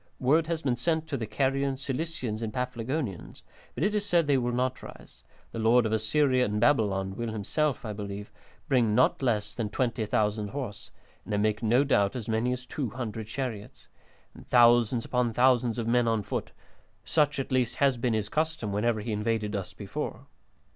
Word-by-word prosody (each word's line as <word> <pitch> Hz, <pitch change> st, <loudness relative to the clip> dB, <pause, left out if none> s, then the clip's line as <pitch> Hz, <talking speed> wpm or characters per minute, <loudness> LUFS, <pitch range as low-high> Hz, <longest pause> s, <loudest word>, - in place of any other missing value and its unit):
Word 155 Hz, +5 st, +3 dB
has 165 Hz, -1 st, -2 dB
been 130 Hz, -3 st, +1 dB
sent 160 Hz, +4 st, 0 dB
to 145 Hz, -, -3 dB
the 115 Hz, -4 st, -3 dB
Carians, 135 Hz, +3 st, 0 dB
Cilicians, 135 Hz, -5 st, -3 dB
and 110 Hz, -1 st, -3 dB
Paphlagonians, 125 Hz, -, -4 dB, 0.3 s
but 135 Hz, -, -2 dB
it 205 Hz, +2 st, +2 dB
is 210 Hz, -1 st, 0 dB
said 175 Hz, -5 st, +2 dB
they 145 Hz, -1 st, +3 dB
will 120 Hz, 0 st, -1 dB
not 130 Hz, +1 st, -1 dB
rise; -, -, -13 dB, 0.3 s
the 115 Hz, -, -5 dB
Lord 115 Hz, +2 st, +4 dB
of 110 Hz, -, -1 dB
Assyria 130 Hz, +4 st, +2 dB
and 105 Hz, -2 st, -1 dB
Babylon 100 Hz, -6 st, +2 dB
will 115 Hz, 0 st, -3 dB
himself, 125 Hz, +6 st, -1 dB
I 105 Hz, -, -3 dB
believe, 100 Hz, 0 st, -6 dB, 0.4 s
bring 120 Hz, -6 st, +3 dB
not 130 Hz, +3 st, +3 dB
less 105 Hz, -5 st, 0 dB
than 110 Hz, -2 st, -3 dB
20,000 110 Hz, -3 st, 0 dB
horse, 125 Hz, -3 st, -6 dB, 0.3 s
and 105 Hz, -, -3 dB
I -, -, +1 dB
make 105 Hz, +1 st, +1 dB
no 120 Hz, +4 st, +3 dB
doubt 100 Hz, -8 st, +2 dB
as 120 Hz, -4 st, -5 dB
many 115 Hz, +2 st, +1 dB
as 125 Hz, 0 st, -4 dB
200 115 Hz, -5 st, -4 dB
chariots, 110 Hz, -4 st, -6 dB, 0.4 s
and -, -, -15 dB
thousands 120 Hz, -1 st, +5 dB
upon 125 Hz, -2 st, 0 dB
thousands 125 Hz, -1 st, +3 dB
of 115 Hz, -, -2 dB
men 120 Hz, 0 st, +3 dB
on 110 Hz, -2 st, +1 dB
foot; -, -, -3 dB, 0.6 s
such 150 Hz, -2 st, +2 dB
at 135 Hz, -, -3 dB
least 125 Hz, -2 st, +1 dB
has 140 Hz, -3 st, +2 dB
been 115 Hz, -1 st, 0 dB
his 105 Hz, -1 st, -1 dB
custom 155 Hz, -6 st, -1 dB
whenever 110 Hz, +2 st, 0 dB
he 110 Hz, +2 st, -4 dB
invaded 105 Hz, 0 st, -1 dB
us 100 Hz, -2 st, -4 dB
before." -, -, -5 dB
120 Hz, 185 wpm, -28 LUFS, 110-130 Hz, 0.6 s, thousands